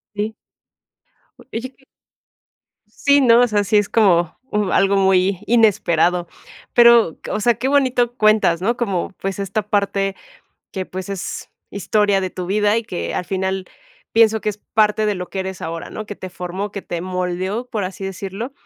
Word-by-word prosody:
Sí. 210 +2 -2 1.0
Oye 240 +3 -7
que 265 - -27 1.2
Sí, 285 0 +6
no, 240 -3 +6
o 245 - +5
sea, 205 -1 +1
sí 210 +2 +1
es 205 -1 +2
como 175 -7 +3 0.2
m 210 -3 0
algo 195 0 +3
muy 190 -1 +3
inesperado, 180 -6 +2 0.5
pero 235 -8 +5
o - - -1
sea, 240 +3 +4
qué 260 - -2
bonito 255 -4 +2
cuentas, 210 -6 +3
¿no? 235 +4 0
como, 200 -7 -1
pues, 195 +1 -3
esta 200 +2 -1
parte 200 -1 0 0.5
que, 190 -2 -4
pues, 185 0 -7
es 195 -2 -5 0.2
historia 205 0 +1
de 185 -1 -3
tu 180 0 -6
vida 210 +2 +2
y 230 - -1
que 180 -5 -4
al 180 - -2
final 190 0 -2 0.5
pienso 220 -1 +4
que 210 - -1
es 210 - -10
parte 215 0 +3
de 210 -2 0
lo 180 0 -6
que 195 - -3
eres 190 -1 -6
ahora, 165 0 -5
¿no? 215 - -7
que 205 - -6
te 185 -2 -8
formó, 180 +3 -5
que 200 - -6
te 175 -2 -5
moldeó, 185 +5 -3
por 220 -4 -3
así 190 +1 -5
decirlo, 195 +6 -5
200 Hz, 175 wpm, -20 LUFS, 185-220 Hz, 1.2 s, Sí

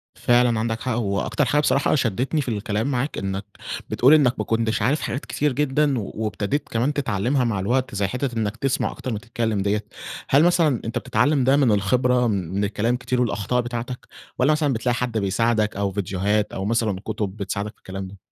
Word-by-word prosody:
فعلًا 120 -2 +3
عندك 115 0 -2
حق. 130 - -2
هو 100 -4 0
أكتر 150 - 0
حاجة 145 +5 +2
بصراحة 140 0 +2
شدتني 130 - 0
في 135 - -6
الكلام 110 +4 -1
معاك 130 +3 -2
إنك 95 +1 -3 0.4
بتقول 130 +5 +5
إنك 135 -5 +4
"ما - - -1
كنتش 115 -1 0
عارف 135 +8 +1
حاجات 135 +5 -3
كتير 150 0 0
جدًا 145 -1 +1
وابتديت 110 +6 -3
كمان 120 +6 0
تتعلمها 125 0 0
مع 115 -5 0
الوقت 125 +4 0
زي 100 0 +1
حتة 125 +2 -3
إنك 110 0 -1
تسمع 135 +1 0
أكتر 130 - -6
ما 105 - -3
تتكلم 115 -2 -2
ديّة." 105 +1 0 0.4
هل 140 +3 +5
مثلًا 165 -7 +3
أنت 115 +2 -3
بتتعلم 135 +6 +2
ده 135 +2 +4
من 135 -5 +4
الخبرة 125 +5 +2
من 95 -2 -1
الكلام 110 +4 0
كتير 125 0 -1
والأخطاء 115 +1 0
بتاعتك، 120 +1 -5 0.3
والّا 130 +4 +4
مثلًا 150 -2 +1
بتلاقي 120 +1 0
حد 120 -1 -2
بيساعدك 110 +2 +1
أو 100 -1 0
فيديوهات 100 +2 -1
أو 95 - -3
مثلًا 110 -3 0
كتب 105 -2 -3
بتساعدك 100 +1 -3
في - - -37
الكلام 95 0 -7
ده؟ 100 +2 -12
115 Hz, 195 wpm, -23 LUFS, 105-130 Hz, 0.4 s, بتقول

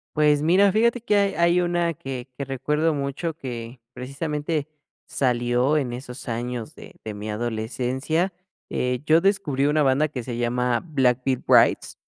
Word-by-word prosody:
Pues 150 -1 +3
mira, 185 +5 +4
fíjate 235 +3 +2
que 210 -3 +1
hay 200 -3 +2
hay 170 +2 +3
una 175 -1 0
que 135 -2 -7
que 140 - -3
recuerdo 150 +4 0
mucho 140 +4 -3
que 120 -3 -7
precisamente 150 +3 -3 0.4
salió 125 +2 +1
en 125 -4 -1
esos 125 +1 -8
años 120 0 -4
de - - -13
de 110 - -5
mi 105 +1 -6
adolescencia. 125 - -2 0.4
Eh, 125 0 -1
yo 160 +2 +5
descubrí 170 -9 +1
una 150 +1 +2
banda 140 +3 +3
que 125 -5 -5
se 120 -1 -5
llama 120 0 0
Black 130 -6 +1
Veil 130 -2 0
Brides. - - +4
140 Hz, 160 wpm, -24 LUFS, 125-160 Hz, 0.4 s, yo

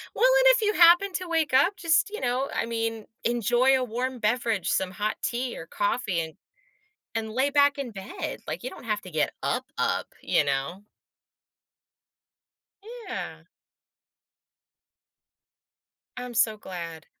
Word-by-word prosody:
Well, - - +2
and - - +5
if - - -1
you 420 - +3
happen 350 +3 +6
to 365 -1 -3
wake 320 -5 0
up, 350 +9 +4
just, 335 +4 +2
you 430 - -6
know, 255 +2 -1
I - - -1
mean, 225 -1 -3 0.2
enjoy 240 +3 +3
a 255 - -1
warm 250 +2 -3
beverage, 225 -2 0
some 185 -1 0
hot 205 +3 -2
tea 250 0 -2
or - - -8
coffee, 250 - -1
and 160 +1 -5 0.8
and 220 -1 -2
lay 265 +4 +1
back 285 0 +4
in 260 -4 -4
bed. 195 -2 -6
Like, - - -4
you 255 - -4
don't - - -12
have 210 -2 -1
to 185 - -10
get 155 -2 0
up-up, - - -1 0.2
you 150 - +2
know? 140 +8 -2 2.3
Yeah! - - -5 2.7
I'm 250 -1 -6
so 220 -1 +2
glad. 170 -5 -7
240 Hz, 145 wpm, -26 LUFS, 210-280 Hz, 2.7 s, happen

